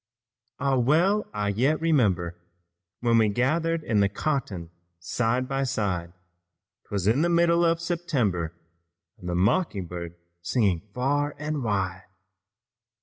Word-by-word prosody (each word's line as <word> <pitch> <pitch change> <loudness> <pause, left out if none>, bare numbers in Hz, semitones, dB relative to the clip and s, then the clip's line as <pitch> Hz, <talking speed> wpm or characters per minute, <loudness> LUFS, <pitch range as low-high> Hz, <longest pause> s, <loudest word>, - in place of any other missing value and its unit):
"Ah, 135 -1 +1
well 170 - +3
I 105 -1 -1
yet 130 +10 +1
remember 100 - +1 0.7
When 115 -1 +4
we 110 -1 +4
gathered 160 +9 0
in 110 -7 +1
the 100 -1 +3
cotton 100 - -3 0.3
side 120 +8 -1
by 135 0 -1
side; 95 -9 -2 0.7
'Twas 100 -3 -2
in 115 +8 +3
the 170 - +2
mild 170 0 +3
September 140 - -1 0.7
And 90 - -6
the 85 - -1
mocking 100 - +1
bird 85 -1 -6
was 85 - -33 0.2
singing 95 -3 +1
far 145 +3 0
and 150 0 -3
wide. 95 -4 -2
120 Hz, 130 wpm, -26 LUFS, 95-155 Hz, 0.7 s, When